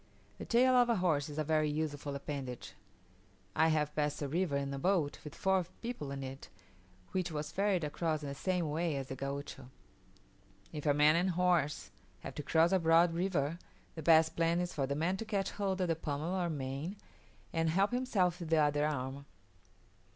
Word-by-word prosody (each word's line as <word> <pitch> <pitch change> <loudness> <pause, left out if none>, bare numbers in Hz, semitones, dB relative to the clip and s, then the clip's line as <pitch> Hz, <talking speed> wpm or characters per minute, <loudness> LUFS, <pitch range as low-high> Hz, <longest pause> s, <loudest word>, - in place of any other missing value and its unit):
The - - -5
tail 255 +2 +4
of 245 -1 +5
a 235 - +3
horse 160 -7 +1
is 150 - -8
a 155 - +1
very 155 0 +1
useful 145 -2 -3
appendage; 135 -3 -6 0.8
I 160 - +4
have 150 -2 +1
passed 150 -1 0
a - - -1
river 160 0 0
in 140 0 -3
a 135 - -4
boat 170 -3 +1
with 150 - -9
four 190 -1 +2 0.2
people 230 - -4
in 135 0 -5
it, 135 +1 -8 0.6
which 180 -2 -1
was 150 -1 -4
ferried 195 -3 +1
across 155 +1 -1
in 145 - -4
the - - -4
same 170 +2 -1
way 165 0 0
as 135 -1 -4
the 130 - -4
Gaucho. 140 -1 -6 1.0
If 150 0 -4
a 145 - +4
man 150 +1 +5
and 180 +3 +2
horse 175 -4 +1 0.3
have - - -7
to - - -5
cross 160 +3 +3
a 190 - +4
broad 165 +1 +4
river, 170 -3 -1 0.3
the 160 - -7
best 160 0 +5
plan 165 +1 +2
is 175 0 -2
for 135 -2 -1
the 140 - -1
man 170 +5 0
to 225 - -5
catch 200 -3 -1
hold 195 -2 -2
of 180 - +1
the 165 - +1
pommel 155 +2 -3
or 180 -2 0
mane, 140 +4 -4 0.6
and 165 0 +1
help 195 +6 +2
himself 200 -9 +1
with 170 -3 -6
the 165 - +3
other 150 0 +3
arm. 140 -1 -4
160 Hz, 200 wpm, -33 LUFS, 145-180 Hz, 1.0 s, of